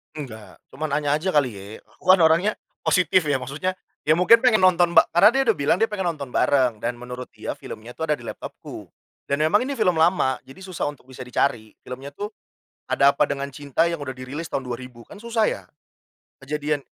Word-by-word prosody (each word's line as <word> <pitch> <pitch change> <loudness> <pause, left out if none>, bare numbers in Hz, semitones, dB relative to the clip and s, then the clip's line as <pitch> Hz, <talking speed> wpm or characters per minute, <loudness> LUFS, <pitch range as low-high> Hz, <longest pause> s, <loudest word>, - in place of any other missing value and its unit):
Enggak, 110 -8 -9
cuma 150 +1 -5
nanya 145 0 +1
aja 185 +5 -1
kali 130 -8 +1
ye. 100 +1 -10 0.3
Aku - - -25
kan 190 - +6
orangnya 165 +6 +4 0.3
positif 185 -1 +3
ya 145 -3 0
maksudnya, 145 +9 -3 0.3
ya 155 - +2
mungkin 185 +9 +5
pengen 235 -5 +5
nonton 175 -2 +4
ba - - +6
karena 175 - +8
dia 270 +1 +2
udah 220 - +4
bilang 145 +4 +1
dia 225 - +3
pengen 190 -5 -2
nonton 140 -4 -7
bareng 125 -4 +2
dan 120 0 -2
menurut 125 +1 -8
dia - - -6
filmnya 115 +3 -10
tuh 160 -1 -2
ada - - +3
di 120 - -11
laptopku. - - -9 0.3
Dan 140 +1 -2
memang 195 +10 +3
ini 275 - -4
film 180 -5 +3
lama, 160 -5 +3
jadi 135 +8 -15
susah 185 -3 -6
untuk 130 -3 -19
bisa 130 -1 -9
dicari, 120 -3 -1
filmnya 135 +3 -9
tuh 205 +8 -5 0.6
Ada 140 0 +4
Apa - - +4
Dengan 140 0 -3
Cinta 145 +3 0
yang 170 - -2
udah 130 -2 -4
dirilis 135 +6 -6
tahun - - -1
2000, 125 -1 -7
kan - - -12
susah 225 0 -1
ya. - - -3 0.8
Kejadian 145 0 -2
145 Hz, 205 wpm, -23 LUFS, 130-180 Hz, 0.8 s, karena